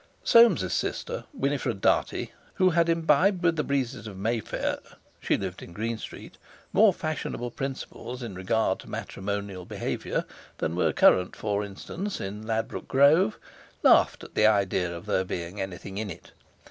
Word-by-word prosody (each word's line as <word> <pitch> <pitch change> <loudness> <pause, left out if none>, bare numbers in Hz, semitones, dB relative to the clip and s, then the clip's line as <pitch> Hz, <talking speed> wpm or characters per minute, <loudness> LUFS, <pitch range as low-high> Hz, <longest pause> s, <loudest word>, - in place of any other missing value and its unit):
Soames's 235 0 +5
sister, - - -2
Winifred 140 - -1
Dartie, - - +1 0.2
who 185 -1 +4
had 170 0 +3
imbibed 165 +3 +3
with 165 -1 +3
the 150 - 0
breezes 130 -5 -2
of 100 -3 -8
Mayfair—she 110 +2 -3
lived 95 -2 -5
in 85 - -10
Green 115 +3 -3
Street—more 215 - 0
fashionable 155 -7 -4
principles 130 -2 -6
in 115 -4 -5
regard 95 +1 0
to - - -12
matrimonial 100 -1 -4
behaviour - - -3 0.3
than 80 - -2
were 90 - +2
current, 90 0 +4
for 105 -1 -1
instance, 165 - -5
in 105 +3 -6
Ladbroke 115 0 -2
Grove, 140 -1 +4 0.5
laughed - - +5
at - - -11
the 105 - +5
idea 95 -4 +2
of 85 +2 -7
there 100 -3 +1
being 90 +1 -5
anything 95 +1 -6
in 110 -2 -3
it. 90 - -10
110 Hz, 145 wpm, -27 LUFS, 95-150 Hz, 0.5 s, Soames's